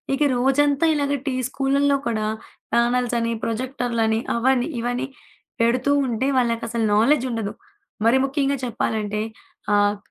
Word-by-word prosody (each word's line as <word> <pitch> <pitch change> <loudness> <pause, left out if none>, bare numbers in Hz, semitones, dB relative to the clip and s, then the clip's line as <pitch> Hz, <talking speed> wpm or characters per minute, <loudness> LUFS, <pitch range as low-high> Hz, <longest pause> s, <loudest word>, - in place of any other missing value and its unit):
ఇక 290 - -8 0.2
రోజంతా 280 +4 +2
ఇలాగ 285 -1 0
టి 265 - 0 0.2
స్కూలల్లో 280 +1 +2
కూడా 215 -2 -1 0.5
ప్యానెల్స్ 240 0 +2
అని, 230 0 0
ప్రొజెక్టరులని, 230 -2 -1 0.2
అవన్న 255 +4 +1
ఇవన్నీ 245 +2 -2 0.5
పెడుతూ 250 +4 +2 0.2
ఉంటే, 240 +3 -1
వాళ్ళకసలు 230 -1 -1
నాలెడ్జ్ 260 +4 +3
ఉండదు. 220 -3 -3 0.5
మరి 250 +3 +5
ముఖ్యంగా 275 0 0
చెప్పాలంటే 215 -2 -2 0.5
ఆహ్, 205 0 +3
245 Hz, 120 wpm, -22 LUFS, 230-270 Hz, 0.5 s, మరి